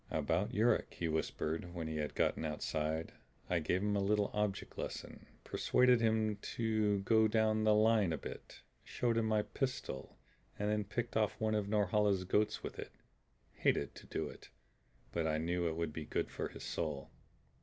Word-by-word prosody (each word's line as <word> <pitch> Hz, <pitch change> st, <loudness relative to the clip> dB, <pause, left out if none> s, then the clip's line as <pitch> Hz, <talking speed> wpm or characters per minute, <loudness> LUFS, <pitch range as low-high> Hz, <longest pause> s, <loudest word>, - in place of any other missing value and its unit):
"About 80 Hz, +6 st, 0 dB
Yuruk," 110 Hz, +5 st, +2 dB
he 85 Hz, -, -2 dB
whispered 80 Hz, +2 st, -2 dB
when 80 Hz, -2 st, -3 dB
he 80 Hz, 0 st, -3 dB
had 75 Hz, -1 st, -3 dB
gotten -, -, +1 dB
outside. 80 Hz, +1 st, -2 dB, 0.4 s
"I 90 Hz, -, +3 dB
gave 90 Hz, +4 st, 0 dB
him 105 Hz, 0 st, +1 dB
a 100 Hz, -, +2 dB
little 105 Hz, +1 st, +2 dB
object 105 Hz, -2 st, -1 dB
lesson. -, -, -6 dB, 0.2 s
Persuaded 125 Hz, -2 st, +3 dB
him 110 Hz, -2 st, +2 dB
to 110 Hz, -2 st, 0 dB
go 110 Hz, +2 st, +4 dB
down 110 Hz, 0 st, +2 dB
the 110 Hz, -1 st, +5 dB
line 110 Hz, -4 st, +4 dB
a 80 Hz, -, 0 dB
bit, -, -, -9 dB, 0.2 s
showed 120 Hz, -2 st, 0 dB
him 115 Hz, -1 st, +2 dB
my 110 Hz, -1 st, +2 dB
pistol, 130 Hz, -, -4 dB, 0.4 s
and 105 Hz, +1 st, 0 dB
then 105 Hz, -1 st, 0 dB
picked 120 Hz, +3 st, -3 dB
off 110 Hz, 0 st, +1 dB
one 110 Hz, 0 st, +1 dB
of 105 Hz, -2 st, 0 dB
Norhala's 105 Hz, -2 st, +2 dB
goats 105 Hz, +3 st, +1 dB
with -, -, -6 dB
it. -, -, -7 dB, 0.6 s
Hated 70 Hz, -, +1 dB
to -, -, -13 dB
do -, -, -2 dB
it, -, -, -11 dB, 0.6 s
but 80 Hz, -1 st, 0 dB
I 80 Hz, -1 st, +1 dB
knew 85 Hz, +2 st, 0 dB
it 80 Hz, -, -1 dB
would 85 Hz, -2 st, -2 dB
be 80 Hz, -1 st, -5 dB
good -, -, -2 dB
for -, -, -3 dB
his -, -, -10 dB
soul. 75 Hz, -4 st, -3 dB
105 Hz, 180 wpm, -35 LUFS, 80-110 Hz, 0.6 s, the